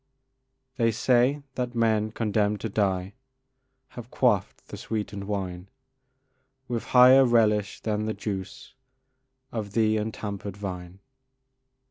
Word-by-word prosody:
They 115 -2 +3
say 125 +5 +2
that 125 -1 -4
men 110 -2 +1
condemned 105 -2 0
to 115 - -3
die 95 -2 -1 0.8
Have 120 -2 -10
quaffed 120 -8 0
the - - -7
sweetened 105 -2 -4
wine 95 -2 -4 1.0
With 120 -2 -3
higher 130 +2 +7
relish 105 -5 +2
than 110 -1 -2
the 110 - -2
juice 105 +5 -6 0.8
Of 105 -3 -5
the 110 -1 +2
untampered 105 -2 -5
vine. 90 -2 -7
110 Hz, 110 wpm, -26 LUFS, 100-115 Hz, 1.0 s, higher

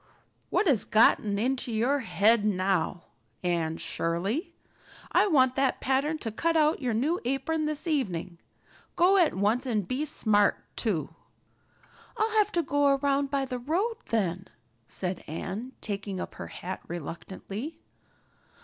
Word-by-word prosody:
"What - - +2
has 250 - +3
got 220 +1 +5
into 235 +5 -1
your 240 +6 +1
head 225 -2 +3
now, 185 -4 0 0.4
Anne 165 -2 0
Shirley? 195 - -2 0.6
I - - +4
want 260 -7 +4
that 270 -1 +1
pattern 275 +4 +1
to 225 - -1
cut 330 +9 +1
out 305 0 +3
your 245 -4 0
new 300 +10 0
apron 275 +5 -1
this 300 +1 -3
evening. 185 - -2 0.6
Go 370 +3 +5
at 345 -5 +3
once 215 +7 +1
and 210 -6 0
be 265 +7 -1
smart 205 -7 +2 0.2
too." 200 -10 -1 1.0
"I'll 440 +1 +1
have 425 -1 +3
to 340 - +2
go 285 -1 +3
around 280 0 +1
by 275 -1 0
the 250 -1 -4
road, 365 - -1
then," 190 -4 -1 0.4
said 180 -1 0
Anne, 195 - -5
taking 200 -2 -4
up - - -5
her - - -7
hat 185 +2 -6
reluctantly. 190 - -6
245 Hz, 140 wpm, -28 LUFS, 195-290 Hz, 1.0 s, got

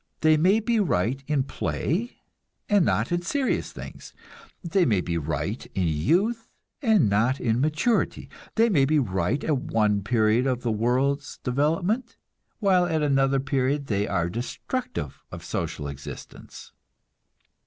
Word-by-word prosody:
They 155 0 +5
may 185 +8 +4
be 225 +1 +1
right 135 - 0
in 145 -3 +1
play, 185 - -2 0.5
and 205 -4 +4
not - - 0
in 175 0 +1
serious 265 +9 -1
things; - - -10 0.5
they 185 +2 +2
may 110 - +2
be 85 -1 -2
right 80 0 -3
in 95 - +1
youth, 185 - +1 0.3
and 220 - +4
not 110 +7 +2
in 115 +1 0
maturity; 155 - 0 0.3
they 230 +1 +4
may 175 -11 +3
be 150 +3 +3
right 95 - 0
at 150 -3 +1
one 105 -4 +1
period 110 +3 +2
of 125 -2 -1
the 120 - 0
world's 130 +6 0
development, 165 - 0 0.4
while 185 -4 +3
at 160 -3 0
another 135 -1 +2
period 135 +1 0
they 105 -3 -1
are 90 -6 0
destructive 120 - -4
of - - -8
social 70 - -3
existence. 70 -1 -10
135 Hz, 145 wpm, -25 LUFS, 110-175 Hz, 0.5 s, They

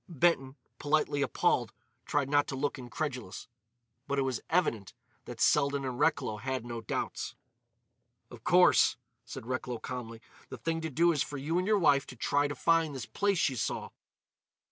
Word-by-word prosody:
Benton, 140 -4 +1 0.2
politely 145 -1 +1
appalled, - - +1 0.4
tried 145 -2 +1
not 145 +1 +2
to 135 - -4
look 140 0 -2
incredulous. 125 -4 -5 0.6
But 140 - -1
it 135 - +2
was 130 -3 -2
evident 125 - 0 0.3
that 120 -1 -8
Selden 140 0 +3
and 125 -2 -4
Recklow 150 -9 +1
had 130 +2 -3
no 120 -1 -5
doubts. 110 - -4 1.0
"Of - - -12
course," - - +5 0.3
said - - -8
Recklow 125 0 -3
calmly, 115 -2 -6 0.3
"the - - -7
thing 165 0 -2
to 160 - -3
do 170 +5 +3
is 150 -4 0
for 145 - -3
you 155 +6 -1
and 185 - -2
your 215 -1 +4
wife 145 -7 +3
to 130 - -9
try 145 +4 +1
to 145 - -5
find 165 -3 +2
this 130 - -5
place 200 -1 0
she 140 -5 +1
saw." 115 - -2
140 Hz, 170 wpm, -30 LUFS, 125-155 Hz, 1.0 s, course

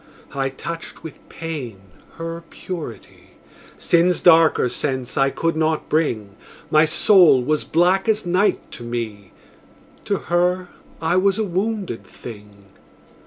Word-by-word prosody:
I 135 -1 -1
touched 165 +5 -7
with 160 - -9
pain 145 -11 -6 0.3
her 165 0 -6
purity; 155 - -9 0.4
Sin's 175 +1 +2
darker 165 -6 +5
sense 130 -1 -3
I 135 0 +3
could 165 +4 -1
not 155 0 0
bring: 110 -11 -1 0.3
My 155 +1 +5
soul 170 - +5
was 155 +3 0
black 180 +5 +2
as 215 -2 +1
night 185 +4 +1
to 120 - -9
me: 110 -5 -5 0.7
To - - 0
her 180 +1 0 0.3
I 165 +2 +1
was 195 +1 +3
a 220 - 0
wounded 195 - -3
thing. 105 -3 -12
160 Hz, 125 wpm, -21 LUFS, 130-180 Hz, 0.7 s, darker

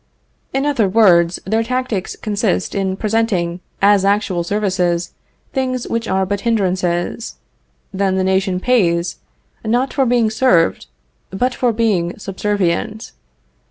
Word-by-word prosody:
In 270 +1 -1
other 245 -9 +1
words, 180 -5 +4
their 220 +4 +1
tactics 245 -5 -2
consist 200 - -1
in 190 -1 -1
presenting 200 -6 0 0.2
as 200 -1 +5
actual 195 -3 +1
services 180 -3 -1 0.4
things 255 -2 -2
which 230 -1 -2
are 190 0 +1
but 200 +1 -2
hindrances; 185 -2 -1 0.6
then 190 0 0
the 190 - +1
nation 190 0 +1
pays, 180 -7 +1 0.5
not 245 +4 0
for 270 -3 +2
being 235 -2 +2
served, 170 - +2 0.4
but 245 +7 -1
for 245 -1 +1
being 205 -7 0
subservient. 205 +1 -2
200 Hz, 125 wpm, -18 LUFS, 185-230 Hz, 0.6 s, as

